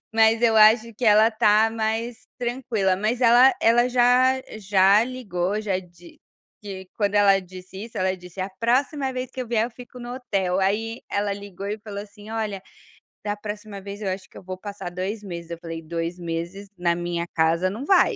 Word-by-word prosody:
mas 225 +1 +4
eu 225 -2 +4
acho 220 +2 +6
que 245 - -4
ela 215 +1 +6
tá 220 0 +4
mais 225 +1 -3
tranquila. 235 -6 0
Mas 215 +5 -1
ela 245 +2 +7
ela 240 +2 +4
já 255 +1 +4 0.2
já 200 +1 +4
ligou, 210 -6 -2
já 195 -3 -1
di 175 -1 -15 0.4
di 190 -3 -8
quando 205 -1 0
ela 200 -1 +5
disse 185 +2 -10
isso, 230 - -12
ela 185 0 0
disse: 180 +1 -10
"A 190 +1 -3
próxima 265 +4 +1
vez 255 0 -4
que 260 - -6
eu 250 - -4
vier, 225 -1 +1
eu - - -9
fico 250 +1 -12
no 240 +1 -6
hotel". 195 -8 -1
Aí 220 +4 -1
ela 205 0 -1
ligou 200 -1 -7
e 210 +1 -3
falou 205 -1 -7
assim: 205 0 -14
"Olha, 215 -3 -3 0.6
da 205 0 -2
próxima 210 0 -7
vez, 200 +1 -8
eu 205 - -3
acho 185 0 -4
que - - -12
eu - - -12
vou 185 0 -6
passar 200 -2 -7
2 190 +4 -4
meses". 170 -4 -7
Eu 170 - -5
falei: 165 -1 -7
"2 165 +2 -4
meses 170 +4 -5
na 175 -1 +2
minha 175 0 -3
casa 165 +3 +2
não 215 +8 -5
vai". 380 +6 +4
205 Hz, 200 wpm, -24 LUFS, 185-230 Hz, 0.6 s, ela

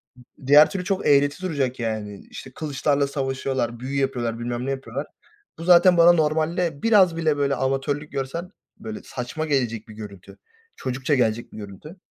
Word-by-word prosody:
M 125 - -17 0.2
diğer 145 +2 +8
türlü 190 -2 -4
çok 195 +1 -1
eğreti 145 +3 +3
duracak 140 -8 -2
yani, 110 -3 -4
işte 130 - -10
kılıçlarla 145 -1 0
savaşıyorlar, 135 -3 -2
büyü 135 +2 -3
yapıyorlar, 120 -4 -2
bilmem 120 +1 -3
ne 135 - -1
yapıyorlar. 135 0 -5 0.5
Bu 165 - -8
zaten 175 +1 +6
bana 170 +1 +8
normalde 160 0 0
biraz 195 -7 +5
bile 155 -3 +1
böyle 140 -1 +1
amatörlük 135 +3 -2
görsen 140 +7 -4 0.3
böyle 220 -1 -7
saçma 130 +6 -5
gelecek 120 -6 -1
bir 110 - -11
görüntü, 100 -3 -11 0.4
çocukça 130 +3 -1
gelecek 115 -2 0
bir - - -10
görüntü. 105 - -10
140 Hz, 165 wpm, -23 LUFS, 125-160 Hz, 0.5 s, diğer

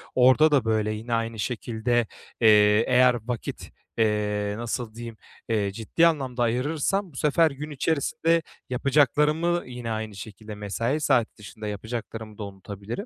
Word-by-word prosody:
orada 130 +5 +5
da, 135 -6 +3
böyle, 110 -1 +1
yine 115 +3 -5
aynı 115 -1 -2
şekilde, 120 +1 -1 0.3
eee, 105 -1 +6
eğer 125 -1 +5
vakit, 120 -3 -5 0.3
eee, 105 -2 0
nasıl 120 -1 -4
diyeyim, 115 -1 -8 0.3
eee, 105 -3 0
ciddi 115 +11 +2
anlamda 130 -6 -1
ayırırsam 150 - 0
bu - - -19
sefer 155 +3 +3
gün 145 +2 -7
içerisinde 160 +3 +1 0.3
yapacaklarımı 150 +6 +2
yine 125 -2 -6
aynı 110 -1 -4
şekilde 105 +1 -9
mesai 115 +8 -2
saati 120 -6 +1
dışında 105 +1 -9
yapacaklarımı 110 +1 -6
da 105 - -5
unutabilirim. 100 - -7
115 Hz, 140 wpm, -25 LUFS, 110-140 Hz, 0.3 s, eee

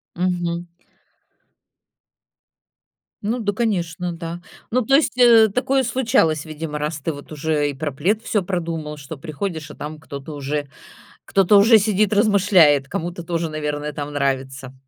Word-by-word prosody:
Мгм. 175 -1 -1 2.6
Ну 225 +4 -1
да, 205 -2 -1
конечно, 180 -6 -1
да. 170 +1 -6 0.3
Ну, 255 +2 +2
то 270 +4 +3
есть, 285 -3 +2
э, 235 -3 +7
такое 265 +5 +1
случалось, 225 - +1
видимо, 155 -1 -5
раз 150 +1 -3
ты 155 +4 -2
вот 145 +1 -11
уже 150 -1 0
и 145 - -4
про 145 +2 -4
плед 185 +11 0
всё 210 -4 0
продумал, 165 -4 -4
что 145 +1 -9
приходишь, 155 0 -5
а - - -12
там 150 +1 -7
кто-то 145 -1 -8
уже, 145 0 -3 0.6
кто-то 195 +1 +4
уже 225 +3 +7
сидит, 210 0 +1
размышляет, 190 -9 +4
кому-то 175 +3 -4
тоже, 170 -1 -2
наверное, 150 -1 -3
там 145 0 -5
нравится. 135 -1 -2
165 Hz, 145 wpm, -21 LUFS, 150-200 Hz, 2.6 s, э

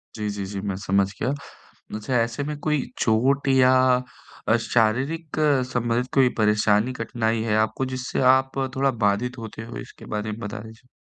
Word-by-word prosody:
जी, 105 -2 -3
जी, 100 -1 -4
जी, 100 +1 -5
मैं 100 -1 -3
समझ 100 0 +2 0.2
गया। - - +1 0.7
अच्छा 110 +4 -4
ऐसे 115 +4 -1
में 150 +1 -4
कोई 150 -1 0 0.2
चोट 130 +6 +2
या 130 -1 +5 0.8
अ, 110 - +5
शारीरिक 130 +9 0 0.4
संबंधित 120 0 0
कोई 130 -2 +5
परेशानी, 105 +2 +2
कठिनाई 115 -2 -1
है 110 -2 0
आपको 110 +4 0
जिससे 130 0 -3
आप 130 0 +1 0.2
थोड़ा 135 0 +2
बाधित 120 +6 0
होते 115 -1 -7
हो, 115 - -8
इसके - - -10
बारे 105 +1 -2
में 105 - -7
बता 105 -2 -5
दीजिए? 110 +2 -14
115 Hz, 170 wpm, -24 LUFS, 105-130 Hz, 0.8 s, या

